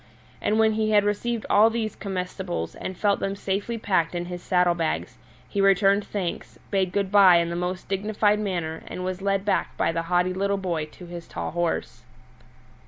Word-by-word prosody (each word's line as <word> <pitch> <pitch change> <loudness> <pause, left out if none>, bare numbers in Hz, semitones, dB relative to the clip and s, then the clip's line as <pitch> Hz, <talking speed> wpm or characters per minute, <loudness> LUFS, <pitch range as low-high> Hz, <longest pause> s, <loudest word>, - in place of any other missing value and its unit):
And 215 - +1
when 220 0 +4
he 215 0 0
had 210 -1 +5
received 215 +2 -1
all 215 +2 +6
these 225 -1 -3
comestibles 185 -2 -4
and 185 - -6
felt 200 0 +2
them 195 0 -2
safely 200 +4 -2
packed 185 -6 0
in 175 0 -2
his 175 0 -6
saddle 180 -1 +3
bags, 80 - -3 0.3
he 200 - -1
returned 195 +1 +4
thanks, 185 -5 -4
bade 190 -3 +1
good 200 -1 -1
bye 195 -3 +7
in 170 0 0
the - - -3
most 180 +1 -3
dignified 210 +1 +1
manner, 170 -6 -3
and 180 - -5
was 185 0 -3
led 195 0 0
back 205 - 0
by - - +2
the 165 0 -1
haughty 180 +1 +2
little 200 +1 0
boy 175 -5 -2
to 175 +3 -13
his 170 -1 -8
tall - - -5
horse. 170 -7 -2
190 Hz, 190 wpm, -25 LUFS, 175-205 Hz, 0.3 s, bye